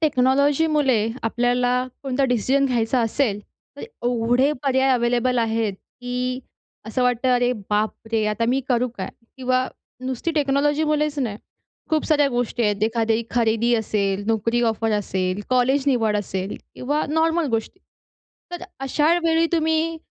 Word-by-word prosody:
टेक्नॉलॉजीमुळे 280 -3 +2 0.2
आपल्याला 245 +2 +1 0.3
कोणता 270 0 0
डिसिजन 260 +3 +2
घ्यायचा 245 -1 +1
असेल, 225 -2 0 0.4
तर - - -9
एवढे 245 - 0
पर्याय 265 -1 +2
अवेलेबल 245 0 +1
आहेत 225 -2 0
की 250 +4 -5 0.5
असं 225 +3 -1
वाटतं 250 +1 +1
"अरे 245 0 +2 0.2
बापरे! 215 +1 -1
आता 215 +2 0
मी 265 +2 +2
करू 250 0 +2
काय?" - - -3 0.3
किंवा 255 0 +1 0.3
नुसती 260 +5 -3
टेक्नॉलॉजीमुळेच 295 +1 +1
नाही 225 -6 -2 0.5
खूप 315 -1 +1
साऱ्या 295 -3 +3
गोष्टी 245 -2 -1
आहेत. 210 -2 0
एखादी 225 0 +1
खरेदी 235 0 +2
असेल, 200 -3 -1
नोकरी 225 +2 +1
ऑफर 225 0 -1
असेल, 190 -2 -1
कॉलेज 255 +2 +3
निवड 225 -6 +2
असेल 190 -1 -3 0.2
किंवा 290 +4 -1
नॉर्मल 320 +2 +1
गोष्टी. 225 +10 -3 0.7
तर 350 0 -6 0.2
अशा 295 +4 +2
वेळी 330 0 +3
तुम्ही 320 0 +1
250 Hz, 130 wpm, -22 LUFS, 225-280 Hz, 0.7 s, साऱ्या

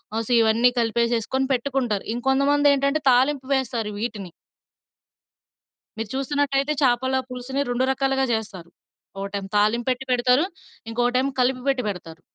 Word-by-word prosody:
ఆహ్, 225 - -1
సో, 250 - -4
ఇవన్నీ 225 +2 +4
కలిపేసేసుకొని 235 +3 0
పెట్టుకుంటారు. 250 -5 -1
ఇంకొంతమంది 275 +3 +2
ఏంటంటే, 280 +2 0
తాలింపు 265 +2 +2
వేస్తారు 235 -5 -2
వీటిని. 210 -6 -5 1.7
మీరు 225 -1 -4
చూసినట్టయితే 280 +1 0
చేపల 260 +1 +2
పులుసుని 250 +2 -4
రెండు 245 +1 +1
రకాలుగా 270 0 0
జేస్తారు. 205 -6 -5 0.5
ఒకటేమో 195 0 -5
తాలింపెట్టి 240 +5 +1
పెడతారు. 250 +5 +3 0.4
ఇంకొకటేమో 245 +3 0
కలిపి 255 0 +1
పెట్టి 265 -2 0
పెడతారు. 170 -4 -8
250 Hz, 115 wpm, -23 LUFS, 225-270 Hz, 1.7 s, ఇవన్నీ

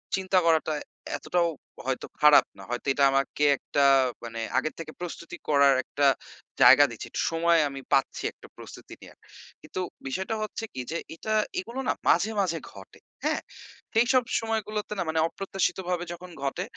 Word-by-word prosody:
চিন্তা 190 0 0
করাটা 160 -1 +3 0.4
এতটাও 175 -1 0 0.4
হয়তো 130 -1 -2 0.2
খারাপ 150 -1 +7
না। - - -11
হয়তো 120 +3 -4
এটা 140 - +1
আমাকে 135 +2 0
একটা 145 - -1 0.4
মানে 115 -1 -6 0.2
আগে 155 - +1
থেকে 165 -1 -6
প্রস্তুতি 170 -1 -6
করার 140 -2 +5
একটা 140 +3 -1 0.6
জায়গা 130 +4 +9
দিচ্ছে। 115 - -8
একটু - - -2
সময় 165 0 +3
আমি 140 0 -7
পাচ্ছি, 135 - +1
একটা - - -16
প্রস্তুতি - - -11
নেয়ার। - - -14 0.4
কিন্তু - - -7 0.3
বিষয়টা 190 +10 -2
হচ্ছে 215 +1 -5
কি? 130 - -6
যে 165 - -1 0.2
এটা 215 +6 -5 0.3
এগুলো 235 +7 -6
না - - +3 0.2
মাঝে 200 +6 +3
মাঝে 170 -4 0
ঘটে। 95 -1 -14 0.2
হ্যাঁ? - - 0 0.5
সেইসব 245 +3 +4 0.2
সময়গুলোতে 215 -2 -3
না - - +1
মানে 160 0 0
অপ্রত্যাশিতভাবে 185 -1 -2
যখন 180 +1 -10
ঘটে, 140 +6 -2
170 Hz, 155 wpm, -27 LUFS, 140-190 Hz, 0.6 s, জায়গা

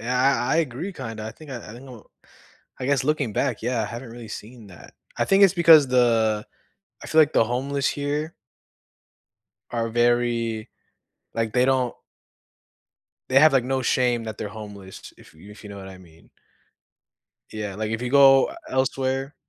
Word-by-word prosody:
I 125 +3 +1
I - - +2
agree 165 +5 -3
kinda, 115 - -7
I 110 - -7
think 155 -2 -14
I 130 - -5
I 105 -2 -10
think 120 +3 -12
I 135 - -12
don't 120 -4 -13 0.8
I - - -2
guess 140 -1 +1
looking 145 -6 -1
back, - - -1
yeah, 120 0 -1
I - - -2
haven't 120 +3 -8
really 115 -1 -10
seen 110 +1 -10
that. 90 -3 -15 0.2
I - - +1
think 195 +1 +4
it's 195 - +5
because 165 -5 +6
the 115 -4 +2 0.6
I - - -8
feel 160 - +4
like 150 -1 +3
the - - +4
homeless 135 +4 -1
here 145 +3 -3 1.4
are 115 -1 -2
very 120 -1 0 0.7
Like, 115 -1 -2
they 125 0 +3
don't 130 -2 +1 1.4
They 130 +1 +5
have 155 0 +6
like 130 -3 +2
no 130 +1 -1
shame 120 -1 +1
that 110 -2 -7
they're 105 - -4
homeless, 100 -3 -11
if - - -19
y 80 - -20
if 105 +1 -14
you 105 - -9
know 100 - -9
what 95 -1 -9
I 95 -1 -12
mean. 85 -3 -20 1.2
Yeah, 105 -2 -5
like, 110 0 -3
if 110 +2 -3
you 125 - -3
go 135 -1 +6 0.2
elsewhere 135 +1 -1
120 Hz, 180 wpm, -23 LUFS, 110-135 Hz, 1.4 s, because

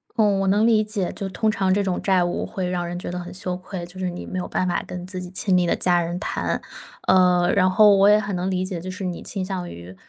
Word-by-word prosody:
嗯， 210 -4 +3
我 195 - 0
能 205 +3 +3
理 220 -2 +4
解， 210 -4 -2
就 195 - -5
通 215 +3 0
常 190 -2 0
这 200 +2 +2
种 185 -2 -1
债 190 -3 +3
务 175 - -2
会 190 -4 -4
让 175 -1 -2
人 175 - -5
觉 175 - -5
得 180 - -4
很 175 0 -8
羞 180 -1 -3
愧， 185 -1 -7
就 180 +2 -10
是 185 - -1
你 175 - -7
没 185 - -4
有 180 - -4
办 185 - -1
法 175 - 0
跟 180 0 -6
自 185 -1 -3
己 180 - -7
亲 185 +1 0
密 180 -1 +3
的 - - +2
家 175 -1 +2
人 170 +1 -3
谈。 - - -2 0.5
呃， 180 -1 +4
然 185 -1 +4
后 205 +2 +6
我 195 +1 +5
也 210 0 +6
很 200 -2 -3
能 180 +1 -2
理 185 0 -1
解， 185 -2 -4
就 185 +3 -7
是 185 +1 -6
你 180 -2 -4
倾 195 -3 -4
向 185 -2 -4
于 85 +2 -10
185 Hz, 305 characters per minute, -23 LUFS, 180-195 Hz, 0.5 s, 后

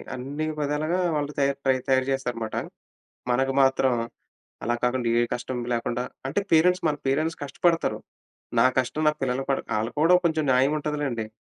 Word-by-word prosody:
అన్ని 140 +5 -4
విధాలుగా 150 +5 0 0.2
వాళ్ళు 145 0 -1
తయారు 140 -2 +1
తయారు 130 0 +3
చేస్తారనమాట. 120 -4 -3 0.8
మనకు 135 +2 +1
మాత్రం, 135 -1 +3 0.7
అలా 120 - +1
కాకుండా 125 -1 +1
ఏ - - +3
కష్టం 125 +1 -4
లేకుండా 120 +1 -1 0.2
అంటే 150 +9 0
పేరెంట్స్ 180 +2 +4
మన 150 - 0
పేరెంట్స్ 155 +4 0
కష్టపడతారు. 165 +4 +1 0.6
నా 115 - +6
కష్టం, 140 +4 0
నా - - +3
పిల్లలు 130 0 0
పడ 135 - +2 0.2
ఆళ్ళకి 115 +6 -3
కూడా 175 +3 +6
కొంచెం 160 -2 0
న్యాయం 130 +3 +4
ఉంటదిలెండి. 145 -7 -2
135 Hz, 145 wpm, -25 LUFS, 125-150 Hz, 0.8 s, నా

